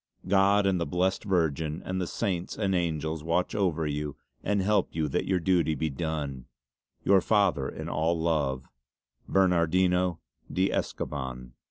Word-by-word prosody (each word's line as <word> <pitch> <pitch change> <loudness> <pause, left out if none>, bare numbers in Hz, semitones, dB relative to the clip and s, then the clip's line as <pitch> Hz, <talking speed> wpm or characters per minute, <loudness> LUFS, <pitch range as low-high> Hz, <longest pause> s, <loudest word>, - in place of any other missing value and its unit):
God 100 +1 +4
and 95 -3 +2
the 85 - -1
Blessed 95 +3 0
Virgin 80 -4 0
and 95 0 -2
the 90 - -2
Saintes 90 -1 -2
and 100 -3 0
Angels 80 -3 -1
watch 85 +2 0
over 85 -6 0
you 75 -1 -3 0.3
and 105 -1 +1
help 105 +2 +2
you 80 -2 0
that - - -1
your 95 -1 +2
duty 85 -3 +2
be 80 +2 -1
done. 70 -4 -3 0.6
"Your 95 -1 +5
father 100 -11 +2
in - - -7
all 80 +2 0
love, 75 -6 0 0.6
"BERNARDINO 90 -1 +3 0.3
DE 95 +1 +1
ESCOBAN." 65 -3 -4
85 Hz, 150 wpm, -28 LUFS, 75-95 Hz, 0.6 s, Your